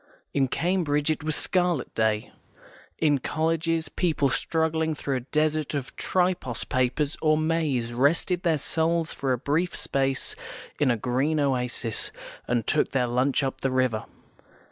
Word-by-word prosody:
In 135 -2 +2
Cambridge 160 -2 +1
it 155 - -3
was 155 -1 0
a - - +3
Scarlet 175 -7 0
Day. 110 -1 0 0.7
In 145 -3 +3
colleges, 165 +2 0
people 150 -3 +1
struggling 160 +2 0
through 140 -2 -2
a 125 +1 -9
desert 155 -1 +1
of 135 -2 -4
Tripos 180 -10 0
papers 130 +4 0
or 155 -1 +4
Mays 155 -7 0
rested 160 +7 +2
their 165 -4 +2
souls 165 +3 0
for 135 -2 -2
a 125 - +2
brief 155 +8 0
space 135 -1 -1 0.4
in 145 - +3
a 120 - +2
green 130 +7 0
oasis, 125 -4 0 0.4
and 120 -3 0
took 155 - +1
their 130 -2 +2
lunch 130 +4 +1
up 135 - -3
the 135 - +1
river. 130 -4 +1
145 Hz, 150 wpm, -26 LUFS, 130-160 Hz, 0.7 s, or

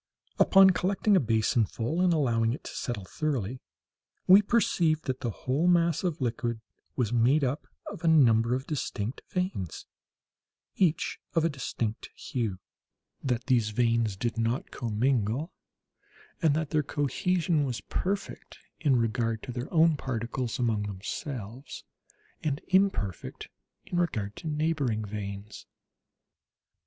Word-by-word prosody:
Upon 195 0 +7
collecting 195 +3 +2
a - - +6
basinful, 115 - +1
and 180 -1 +4
allowing 115 -7 +2
it 135 - -7
to - - -7
settle 110 -6 -4
thoroughly, 130 - -2 0.7
we 190 +3 +8
perceived 175 -8 +2
that 130 -1 -2
the 120 - -2
whole 135 - -1
mass 170 -2 +3
of 170 -3 -1
liquid 120 -2 -2 0.4
was 120 -3 0
made 125 +6 +4
up 135 +3 -1 0.2
of 175 - -8
a - - +1
number 120 -6 +5
of 130 +1 -4
distinct 125 -6 -3
veins, 180 - -3 0.9
each 170 -4 +1 0.2
of 165 -1 +3
a - - +3
distinct 120 -6 -4
hue; 110 -7 -3 0.7
that 125 -2 -1
these 120 -5 +2
veins 115 -1 +1
did 115 +2 -2
not 115 +3 -1
commingle; 120 - 0 0.9
and 155 -4 +3
that 155 -2 -2
their 155 -2 +3
cohesion 160 - 0
was 125 -6 -3
perfect 195 - -4 0.2
in 145 -5 +3
regard 115 -1 0
to 130 - -5
their 120 +3 -5
own 160 -2 +4
particles 120 -1 -3
among 115 -5 +1
themselves, 115 +5 -6 0.6
and 145 -2 -1
imperfect 185 - 0 0.4
in 175 - -2
regard 105 - -1
to - - -7
neighbouring 150 -8 0
veins. 100 0 -7
130 Hz, 130 wpm, -28 LUFS, 115-160 Hz, 0.9 s, we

